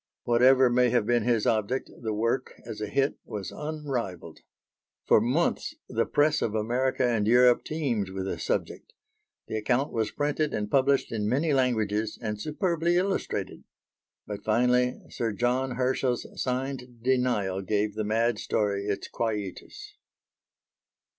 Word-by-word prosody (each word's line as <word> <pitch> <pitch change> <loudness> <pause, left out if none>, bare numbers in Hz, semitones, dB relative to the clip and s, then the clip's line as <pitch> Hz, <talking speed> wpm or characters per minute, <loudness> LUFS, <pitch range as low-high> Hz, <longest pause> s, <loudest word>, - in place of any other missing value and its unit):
Whatever 130 +2 +5
may 125 0 +3
have 120 -3 +2
been 120 +1 +2
his 115 -1 +1
object, 115 +4 0
the 110 -2 -2
work, 115 +4 -1
as 110 -2 -7
a 105 - -2
hit, 135 +7 0
was 105 -2 -6
unrivalled. 130 - -5 0.7
For - - +5
months 130 +10 0
the - - 0
press 150 +1 +2
of 110 - -1
America 125 +4 0
and 110 -4 +1
Europe 125 +1 +5
teemed 125 -11 -2
with 95 0 -4
the 95 - -3
subject; - - -3 0.5
the 110 - -3
account 125 +6 0
was 110 -2 0
printed 150 +1 -1
and 105 -1 -3
published 140 0 +2
in 105 -2 -1
many 145 +5 +1
languages 110 -5 0
and 105 -3 -4
superbly 170 - 0
illustrated. 190 +2 -2 0.6
But, 105 -1 -6
finally, 125 +3 +2
Sir 115 -2 -2
John 125 +3 0
Herschel's 125 -1 0 0.2
signed 125 -2 -3
denial 120 -7 +1
gave 105 +2 0
the 110 +1 -2
mad 110 +1 +1
story 100 -1 -1
its 100 -1 -2
quietus. 115 - -5
120 Hz, 140 wpm, -27 LUFS, 105-130 Hz, 0.7 s, Whatever